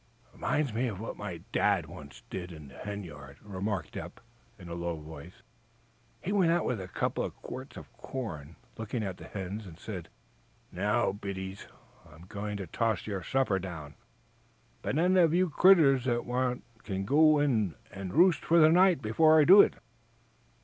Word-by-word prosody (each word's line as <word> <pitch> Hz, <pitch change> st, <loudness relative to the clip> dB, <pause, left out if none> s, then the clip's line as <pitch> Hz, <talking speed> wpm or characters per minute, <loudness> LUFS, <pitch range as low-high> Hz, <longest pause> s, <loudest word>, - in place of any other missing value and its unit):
"Reminds 150 Hz, -6 st, -1 dB
me 120 Hz, +3 st, 0 dB
of 100 Hz, -5 st, -5 dB
what 115 Hz, -, -5 dB
my 90 Hz, -6 st, -6 dB
Dad 100 Hz, -5 st, +2 dB
once 75 Hz, -3 st, -12 dB
did 90 Hz, -1 st, -5 dB
in 75 Hz, -4 st, -11 dB
the -, -, -16 dB
hen 105 Hz, 0 st, -5 dB
yard," 70 Hz, -5 st, -11 dB
remarked 100 Hz, -1 st, -4 dB
Eph, -, -, -6 dB, 0.4 s
in 90 Hz, -, -12 dB
a 85 Hz, -, -6 dB
low 85 Hz, -1 st, -3 dB
voice. 80 Hz, +2 st, -12 dB, 0.8 s
"He 190 Hz, -, -2 dB
went 190 Hz, -5 st, +3 dB
out 170 Hz, 0 st, +1 dB
with 115 Hz, -6 st, -1 dB
a 90 Hz, -, -7 dB
couple -, -, -2 dB
of -, -, -5 dB
quarts 130 Hz, +2 st, -8 dB
of -, -, -12 dB
corn, 85 Hz, -, -6 dB, 0.2 s
looked 110 Hz, +1 st, -5 dB
at 100 Hz, -6 st, -3 dB
the -, -, -11 dB
hens, 100 Hz, +2 st, -6 dB
and 80 Hz, -3 st, -12 dB
said: 90 Hz, -4 st, -7 dB, 0.6 s
'Now, -, -, +1 dB
biddies, 95 Hz, -1 st, -6 dB, 0.4 s
I'm 80 Hz, +2 st, -15 dB
going 105 Hz, +2 st, -5 dB
to 100 Hz, -, -5 dB
toss 110 Hz, +2 st, -1 dB
your 100 Hz, -3 st, -3 dB
supper 130 Hz, -4 st, 0 dB
down. 80 Hz, -6 st, -7 dB, 0.9 s
But 135 Hz, -, -2 dB
any 180 Hz, +3 st, +4 dB
of 165 Hz, -2 st, +4 dB
you 180 Hz, -2 st, +2 dB
critters 145 Hz, -7 st, +5 dB
that 120 Hz, -2 st, 0 dB
want 125 Hz, 0 st, -1 dB, 0.2 s
can 95 Hz, -2 st, -3 dB
go 155 Hz, +5 st, +5 dB
in 115 Hz, -, +1 dB, 0.2 s
and 95 Hz, -2 st, -6 dB
roost 175 Hz, -, +4 dB
for 170 Hz, -, +3 dB
the 155 Hz, -1 st, +7 dB
night 180 Hz, -3 st, +4 dB
before 155 Hz, +9 st, +5 dB
I -, -, +7 dB
do 190 Hz, +7 st, +9 dB
it.'" -, -, +2 dB
105 Hz, 180 wpm, -30 LUFS, 90-135 Hz, 0.9 s, do